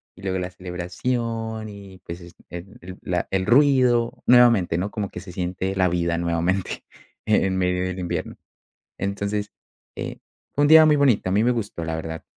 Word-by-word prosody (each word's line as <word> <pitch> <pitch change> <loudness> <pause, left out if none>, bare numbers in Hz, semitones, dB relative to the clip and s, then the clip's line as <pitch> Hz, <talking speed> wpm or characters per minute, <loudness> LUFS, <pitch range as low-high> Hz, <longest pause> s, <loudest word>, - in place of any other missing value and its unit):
Y 90 - -15
luego 95 -1 -2
la 90 0 -3
celebración 110 +5 -4
y, 100 -2 -11
pues, 85 +1 -7
es 85 0 -13
ed 90 +2 -8
el 90 +1 -9
la 90 -1 -2
El 95 -1 0
ruido 125 -1 +3
nuevamente, 120 -9 +5
¿no?, 95 +4 -2
como 105 -3 -3
que - - -8
se 90 0 -10
siente 90 +2 -3
la 95 -1 +3
vida 85 -1 0
nuevamente 85 +2 -1 0.4
e 110 -2 +3
en 95 -1 -1
medio 90 0 0
del 95 0 -3
invierno. 90 -1 -4 0.6
Entonces, 100 +1 -3 0.4
eh, - - -5 0.4
fue 145 - +1
un - - +5
día 160 +1 +9
muy 155 -1 +5
bonito. 130 -9 +2
A - - -1
mí 105 +3 +3
me 125 - +3
gustó 105 -7 -4
la 80 0 -2
verdad. 80 0 -6
95 Hz, 190 wpm, -23 LUFS, 90-115 Hz, 0.6 s, día